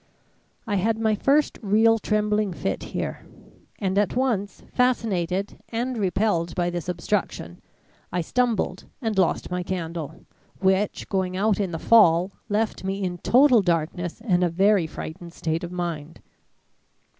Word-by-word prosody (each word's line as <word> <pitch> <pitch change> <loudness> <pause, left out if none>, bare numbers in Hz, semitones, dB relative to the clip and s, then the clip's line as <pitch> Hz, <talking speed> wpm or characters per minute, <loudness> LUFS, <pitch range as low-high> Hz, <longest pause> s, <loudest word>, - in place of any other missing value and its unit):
I 205 -2 0
had 220 +4 +1
my 220 -1 +2
first 280 +8 +2
real 225 +2 +4
trembling 210 -1 0
fit - - -3
here, - - -4 0.5
and 195 -1 0
at 205 - 0
once 235 -6 -1
fascinated 200 -7 0
and 245 +3 -2
repelled 190 -4 0
by 175 0 0
this 175 0 -4
obstruction 175 - -2 0.5
I 180 - 0
stumbled 225 -2 0
and 225 -5 -2
lost 180 -1 +1
my 180 0 -1
candle, 170 -3 -5 0.3
which, 190 +1 +1
going 185 -2 -1
out 210 +1 +2
in 195 -3 0
the 165 - -4
fall, 180 -2 +5 0.2
left 210 -1 -1
me 195 +1 -2
in 180 -1 -3
total 250 - +5
darkness 175 +1 -1
and 185 -6 +2
a 175 - +3
very 190 0 +3
frightened 170 +2 -8
state 160 0 -2
of 175 - -5
mind. 170 -3 -4
190 Hz, 145 wpm, -24 LUFS, 175-215 Hz, 0.5 s, fall